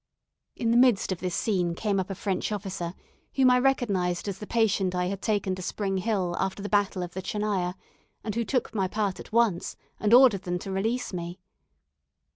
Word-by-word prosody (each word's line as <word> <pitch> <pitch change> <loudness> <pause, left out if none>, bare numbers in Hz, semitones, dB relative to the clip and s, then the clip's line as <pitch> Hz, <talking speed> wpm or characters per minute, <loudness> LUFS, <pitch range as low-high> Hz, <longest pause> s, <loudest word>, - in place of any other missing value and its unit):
In 230 -1 0
the 235 - +4
midst 245 -6 +4
of 185 - -2
this 180 -1 -2
scene 180 -6 0
came 200 0 0
up 190 - -3
a 195 - -3
French 195 +2 -2
officer, 185 -4 -4 0.4
whom 260 -2 +5
I 250 - +5
recognised 205 -10 +1
as 195 -1 -4
the 210 - -7
patient 200 -5 +1
I 180 0 +1
had 195 +1 -3
taken 205 -3 0
to 185 - -5
Spring 195 +1 -2
Hill 185 -4 0
after 190 +1 -2
the 205 - -4
battle 205 -3 +1
of 175 - -7
the 190 - -4
Tchernaya, 190 -3 -1 0.5
and 215 - -3
who 235 +2 0
took 250 +1 -1
my 195 -4 +1
part 200 -1 -2
at - - -10
once, 225 -6 +1 0.2
and 210 - +1
ordered 245 -5 +7
them 180 -2 -2
to 195 +2 -6
release 220 +5 -1
me. 175 +1 -5
195 Hz, 205 wpm, -27 LUFS, 185-220 Hz, 0.5 s, ordered